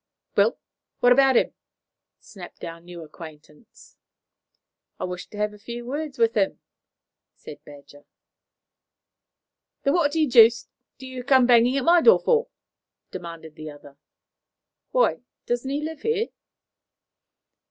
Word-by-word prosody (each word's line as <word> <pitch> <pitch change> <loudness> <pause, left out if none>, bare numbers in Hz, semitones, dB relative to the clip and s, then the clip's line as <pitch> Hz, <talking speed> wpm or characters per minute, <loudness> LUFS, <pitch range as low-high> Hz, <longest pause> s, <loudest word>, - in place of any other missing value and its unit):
"Well? - - +3 0.4
What 245 - +5
about 265 0 +5
him?" - - +1 0.7
snapped 185 -4 -13
our 165 0 -7
new 175 -1 -11
acquaintance. 155 +3 -15 1.0
"I - - -4
wished 180 0 -6
to 210 - -11
have 210 0 -1
a 210 - -15
few 240 +3 -8
words 290 +3 -5
with 230 -1 +2
him," 200 -3 0 0.8
said - - -12
Badger. 145 0 -15 1.8
"Then 275 - +2
what 325 -4 +1
the 320 -1 +2
deuce 235 -3 +5 0.3
do 260 - -11
you 255 -1 -7
come 260 -1 +4
banging 245 +2 +4
at 270 - -2
my 345 0 +5
door 465 - +7
for?" 475 0 +1 0.6
demanded 165 -3 -9
the 155 0 -9
other. 145 -1 -14 0.9
"Why, - - +1 0.3
doesn't 240 +2 -2
he 285 +2 -2
live 315 -1 -6
here?" 455 0 -1
240 Hz, 130 wpm, -24 LUFS, 170-275 Hz, 1.8 s, door